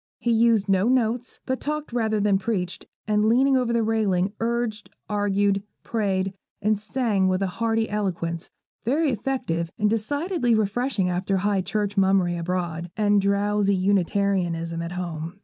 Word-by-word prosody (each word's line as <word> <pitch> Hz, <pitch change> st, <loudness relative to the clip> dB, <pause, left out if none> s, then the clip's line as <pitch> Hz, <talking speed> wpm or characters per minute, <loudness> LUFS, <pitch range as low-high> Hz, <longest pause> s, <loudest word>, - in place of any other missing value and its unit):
He 240 Hz, -1 st, 0 dB
used 225 Hz, -2 st, +3 dB
no 195 Hz, +2 st, +3 dB
notes, 245 Hz, -1 st, 0 dB
but 260 Hz, -1 st, -2 dB
talked 300 Hz, -3 st, -3 dB
rather 220 Hz, -3 st, +1 dB
than 200 Hz, -1 st, +2 dB
preached; 190 Hz, -4 st, -3 dB, 0.2 s
and 210 Hz, 0 st, +2 dB
leaning 265 Hz, +4 st, +4 dB
over 250 Hz, -2 st, +1 dB
the 235 Hz, -1 st, +2 dB
railing, 205 Hz, -4 st, +1 dB
urged, 230 Hz, -2 st, -2 dB, 0.2 s
argued, 205 Hz, -1 st, +1 dB, 0.2 s
prayed, 195 Hz, -4 st, -1 dB, 0.3 s
and 210 Hz, 0 st, +1 dB
sang 215 Hz, -4 st, 0 dB
with 185 Hz, +1 st, +1 dB
a 190 Hz, +4 st, -5 dB
hearty 225 Hz, -1 st, +1 dB
eloquence, 170 Hz, -5 st, -2 dB, 0.3 s
very 285 Hz, +5 st, +1 dB
effective, 205 Hz, -9 st, -2 dB
and 210 Hz, -1 st, +2 dB
decidedly 275 Hz, -, 0 dB
refreshing 220 Hz, -1 st, 0 dB
after 185 Hz, +2 st, 0 dB
High 200 Hz, 0 st, +1 dB
Church 205 Hz, +2 st, -2 dB
mummery 190 Hz, -2 st, +3 dB
abroad, 170 Hz, -1 st, -3 dB
and 205 Hz, -1 st, +3 dB
drowsy 200 Hz, 0 st, +2 dB
Unitarianism 185 Hz, -3 st, 0 dB
at 170 Hz, +1 st, -5 dB
home. 170 Hz, 0 st, -5 dB
205 Hz, 150 wpm, -24 LUFS, 185-230 Hz, 0.3 s, leaning